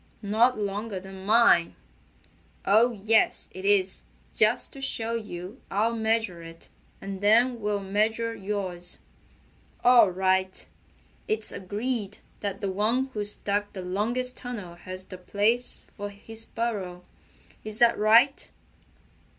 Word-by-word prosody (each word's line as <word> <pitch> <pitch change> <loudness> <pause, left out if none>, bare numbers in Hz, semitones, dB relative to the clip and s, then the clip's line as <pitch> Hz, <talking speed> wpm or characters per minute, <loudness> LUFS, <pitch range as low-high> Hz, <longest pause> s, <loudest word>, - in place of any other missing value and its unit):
"Not 225 +5 +3
longer 205 0 -3
than 190 0 -10
mine." 215 -6 +4 0.9
"Oh, 225 +5 +5
yes, 220 0 +1
it 185 +1 -8
is. 195 -2 +2 0.3
Just 215 +2 +2
to 275 - -9
show 230 -4 -2
you 210 -1 -6
I'll 225 +4 0
measure 220 -5 0
it, 165 0 -13 0.3
and 195 0 -7
then 235 +4 +4
we'll 205 -1 -1
measure 220 +4 0
yours." 190 -4 -4 0.9
"All 245 -5 +7
right! 190 0 0 0.6
It's 215 0 +3
agreed 210 +2 -3 0.2
that 200 +1 -4
the 200 -2 -1
one 230 +7 0
who's 205 -1 +2
dug 205 0 -1
the 185 - -6
longest 230 +7 -1
tunnel 225 -9 -7
has 185 +2 -9
the 185 -1 -11
place 215 +6 +1
for 205 -1 -5
his 225 +2 -4
burrow. 195 -6 -4 0.6
Is 215 0 -4
that 235 0 +5
right?" 230 +6 +4
210 Hz, 125 wpm, -26 LUFS, 190-230 Hz, 0.9 s, All